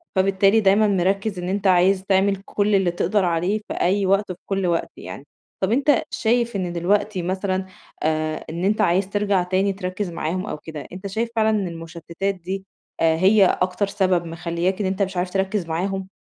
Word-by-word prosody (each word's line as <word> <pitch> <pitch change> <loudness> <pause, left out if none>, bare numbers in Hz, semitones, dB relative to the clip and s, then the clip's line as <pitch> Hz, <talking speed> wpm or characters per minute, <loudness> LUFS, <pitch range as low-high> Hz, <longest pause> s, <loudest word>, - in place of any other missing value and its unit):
فبالتالي 195 +2 +3
دايمًا 210 +1 +4
مركّز 195 +1 0
إن 180 0 -4
أنت 200 +1 0
عايز 185 +1 +4
تعمل 195 +1 +2
كل 205 0 +1
اللي 190 -3 +2
تقدر 185 +3 +1
عليه 175 +5 0
في - - -4
أي 195 +2 +1
وقت 195 +1 +1
وفي 180 - -8
كل 195 -1 -1
وقت 170 -1 -1
يعني. 140 - -9 0.4
طب 190 +1 +1
أنت 280 +4 +3
شايف 235 0 0
إن 180 -3 -2
دلوقتي 190 +3 0
مثلًا 185 +1 -2 0.4
آآ، 155 0 -1
إن 170 +2 -4
أنت 210 +2 +2
عايز 190 0 +2
ترجَع 205 -2 +1
تاني 190 +2 +1
تركّز 185 +1 -4
معاهم 170 +3 -3
أو 210 - -4
كده، 155 0 -8
أنت 190 +2 -6
شايف 220 +4 -2
فعلًا 220 -1 +3
إن 210 -3 0
المُشتتات 170 +3 -4
دي 190 +2 -6 0.4
آآ، 160 -1 +4
هي 195 +3 +5
أكتر 185 +2 0
سبب 185 -3 +1
مخلّياك 170 +3 -2
إن 195 - 0
أنت 190 +1 -2
مش 190 -1 -1
عارف 180 +1 0
تركّز 190 0 -1
معاهم؟ 190 +4 -2
190 Hz, 190 wpm, -22 LUFS, 175-200 Hz, 0.4 s, هي